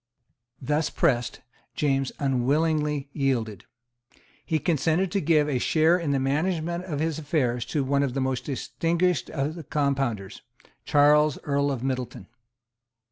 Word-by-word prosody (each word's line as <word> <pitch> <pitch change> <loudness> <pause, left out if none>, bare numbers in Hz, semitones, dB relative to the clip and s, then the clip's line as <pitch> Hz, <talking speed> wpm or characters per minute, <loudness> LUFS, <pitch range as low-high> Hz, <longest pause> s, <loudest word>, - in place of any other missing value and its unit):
Thus 150 +3 0
pressed, 125 -8 0 0.3
James 135 -2 0
unwillingly 145 +2 0
yielded. 120 - -1 0.8
He 160 - 0
consented 165 +4 +1
to 200 - 0
give 150 -1 +3
a 135 -4 0
share 160 +5 +3
in 165 -4 -3
the 140 -1 +1
management 165 +5 -1
of 150 -6 -4
his 160 0 -1
affairs 125 -6 -1
to 140 +3 -1
one 140 +1 +1
of 135 -2 -1
the - - 0
most 130 -1 -2
distinguished 165 +3 -1
of 145 +1 -2
the 165 -1 -8
Compounders, 135 -9 -2 0.4
Charles 150 0 +4
Earl 140 0 0
of 130 -3 -4
Middleton. 130 -6 -3
145 Hz, 135 wpm, -26 LUFS, 135-160 Hz, 0.8 s, Charles